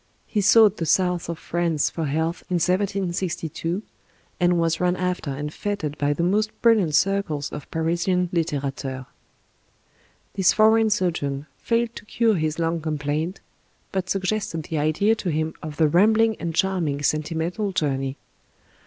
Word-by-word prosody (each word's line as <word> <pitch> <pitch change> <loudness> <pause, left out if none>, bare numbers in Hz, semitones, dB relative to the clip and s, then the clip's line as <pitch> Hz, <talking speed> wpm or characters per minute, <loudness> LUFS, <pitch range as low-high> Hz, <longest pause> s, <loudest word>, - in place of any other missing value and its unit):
He 210 - -1
sought 210 0 +6
the 165 - -2
South 180 +1 +1
of 170 - -3
France 165 -3 0
for 165 - -3
health 160 +4 -1
in 180 - 0
1762, 180 -1 -1 0.6
and 175 -1 +3
was 165 -1 +1
run 180 0 +2
after 180 -4 -2
and 145 +2 -4
f^ted 170 -6 -3
by 145 0 +1
the 155 +4 -1
most 210 +5 +2
brilliant 210 -10 +4
circles 190 -8 0
of 150 - -8
Parisian 175 +3 0
litterateurs. 140 -5 -2 1.3
This 190 -3 +3
foreign 220 +1 +4
sojourn 150 -8 -1
failed 235 0 0
to - - -10
cure 230 +1 +2
his 155 -4 -1
lung 165 0 -1
complaint, 155 +3 -2 0.5
but 185 -1 -2
suggested 190 -4 -1
the 155 0 -3
idea 155 +9 +2
to 210 -5 -3
him 155 0 -1
of 155 -1 -7
the 160 - +4
rambling 220 +7 +4
and 165 -1 -3
charming 170 -6 0
"Sentimental 165 +7 -1
Journey." 135 -6 -1
170 Hz, 145 wpm, -24 LUFS, 155-195 Hz, 1.3 s, sought